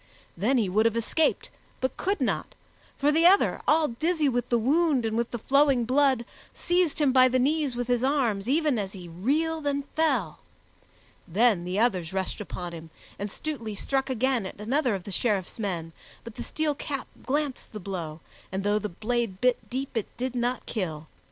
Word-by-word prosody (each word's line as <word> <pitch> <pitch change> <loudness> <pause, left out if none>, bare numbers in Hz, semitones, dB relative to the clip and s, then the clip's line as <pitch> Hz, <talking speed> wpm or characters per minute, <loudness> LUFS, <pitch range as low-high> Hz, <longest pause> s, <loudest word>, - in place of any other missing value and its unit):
Then 235 +9 +2
he 220 -5 +2
would 215 +5 +3
have 230 0 -1
escaped, 300 +7 0 0.3
but 260 - -1
could 400 +2 -1
not, - - -1 0.4
for 290 +2 +3
the 325 +3 +5
other, 390 +2 +4
all 310 0 +4
dizzy 310 +5 +1
with 245 -3 0
the 240 - +3
wound 280 +1 +2
and 220 0 -1
with 235 0 0
the 240 - -4
flowing 270 0 +3
blood, 260 -1 +3 0.3
seized 350 -3 +1
him 295 -3 +3
by 255 0 +6
the 255 0 +1
knees 285 0 +1
with 245 0 -2
his 245 -1 +1
arms 245 -7 +1
even 295 -4 +2
as 195 -2 -4
he 180 -3 -9
reeled 290 - -1
and 280 0 -1
fell. 265 - 0 0.9
Then 200 -1 +3
the 180 +2 -2
others 190 -7 +1
rushed 190 +2 -2
upon 180 -3 -6
him, 165 -1 -9 0.3
and 205 +1 -3
Stutely 235 -8 -5
struck 270 +5 -1
again 255 -4 +1
at - - -10
another 245 +2 +1
of 190 - -6
the 200 - -8
Sheriff's 200 -1 -1
men, 170 -6 -3 0.3
but 230 - -9
the - - -7
steel 310 -1 -1
cap 280 -1 -4 0.2
glanced 285 -1 -2
the 215 - -6
blow, 170 -5 -5 0.3
and 190 +1 -2
though 205 +1 +2
the 210 0 -4
blade 220 +1 -2
bit 250 +1 +1
deep, 265 +1 -4
it 225 - -1
did 255 +1 -2
not 245 +1 -1
kill. 165 -8 -3
245 Hz, 190 wpm, -27 LUFS, 205-280 Hz, 0.9 s, by